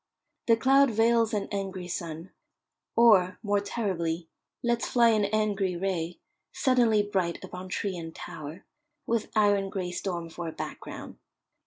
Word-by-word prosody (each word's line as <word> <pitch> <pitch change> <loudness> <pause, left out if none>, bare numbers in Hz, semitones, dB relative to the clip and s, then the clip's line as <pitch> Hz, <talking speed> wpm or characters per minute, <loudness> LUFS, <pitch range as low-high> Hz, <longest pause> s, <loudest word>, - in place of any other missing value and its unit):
The 230 -1 +5
cloud 270 +3 +5
veils 230 0 +3
an 210 -3 -1
angry 195 -3 -4
sun, 170 0 -5 0.6
or, 200 -6 +5
more 205 -1 +2
terribly, 175 -6 -2 0.4
lets 235 0 +1
fly 235 -1 +5
an 215 -2 +3
angry 200 -3 0
ray, 175 -2 -2 0.3
suddenly 235 -5 +3
bright 190 -4 -1
upon 180 +1 -8
tree 190 +1 -2
and 165 -1 -6
tower, 155 +4 -8 0.4
with 230 -2 -1
iron 205 -2 +3
grey 185 -2 -3
storm 175 -2 -3
for 165 +1 -6
a - - -3
background. - - -7
200 Hz, 140 wpm, -28 LUFS, 180-225 Hz, 0.6 s, The